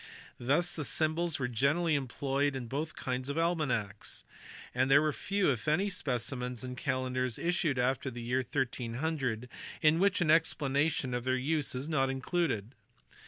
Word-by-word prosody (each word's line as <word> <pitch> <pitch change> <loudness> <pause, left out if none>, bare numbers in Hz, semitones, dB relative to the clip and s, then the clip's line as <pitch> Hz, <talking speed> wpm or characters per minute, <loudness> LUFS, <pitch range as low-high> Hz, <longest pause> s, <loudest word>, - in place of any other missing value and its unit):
Thus 150 +8 +2
the 155 - -2
symbols 160 +2 +1
were 125 - -1
generally 140 +8 +2
employed 140 +1 0
in 130 -2 -4
both 145 +7 -3
kinds 130 0 -3
of 140 - -2
almanacks, 135 - -1 0.5
and 130 +1 +2
there 145 +3 +6
are 155 - +1
few, 195 -2 +1
if 125 0 -4
any, 185 +7 +2
specimens 125 - -2
of 125 0 -5
calendars 130 -2 -1
issued 170 -5 0
after 130 +1 +1
the 120 -1 -7
year 125 +2 +1
1300 125 -1 -2 0.4
in 155 +1 +5
which 200 +1 +3
an 165 -4 +3
explanation 145 -4 +2
of 125 -1 -1
their 130 0 +1
use 145 +1 -1
is 130 +3 -3
not 135 -4 +1
included. 135 - -1
135 Hz, 160 wpm, -31 LUFS, 125-155 Hz, 0.5 s, there